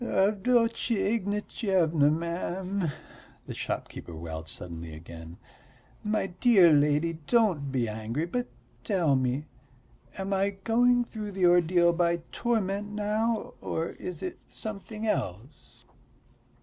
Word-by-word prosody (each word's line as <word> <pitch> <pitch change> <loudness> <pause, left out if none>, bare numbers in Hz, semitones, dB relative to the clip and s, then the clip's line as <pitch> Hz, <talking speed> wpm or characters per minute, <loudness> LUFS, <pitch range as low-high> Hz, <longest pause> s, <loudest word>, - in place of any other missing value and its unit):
"Avdotya 230 +2 +2
Ignatyevna, 195 - +1
ma'am," 175 +2 -2 0.5
the - - -6
shopkeeper 85 - -5
wailed 80 0 -6
suddenly 85 -2 -6
again, 80 +1 -10 0.7
"my 210 -1 0
dear 185 -2 +5
lady, 150 +3 +2
don't 190 - +2
be 125 -3 0
angry, 110 +8 -3
but 245 +8 -2 0.4
tell 175 -9 +2
me, 130 +3 0 0.7
am 195 0 -2
I 195 +1 0
going 245 +2 +4
through 210 -3 -6
the 190 -1 +2
ordeal 175 0 +5
by 170 0 +1
torment 205 -3 -1
now, 215 +2 -1
or 165 +1 -2
is 180 - -7
it 365 - -5
something 215 +1 -6
else?" 130 - -4
180 Hz, 110 wpm, -28 LUFS, 145-210 Hz, 0.7 s, dear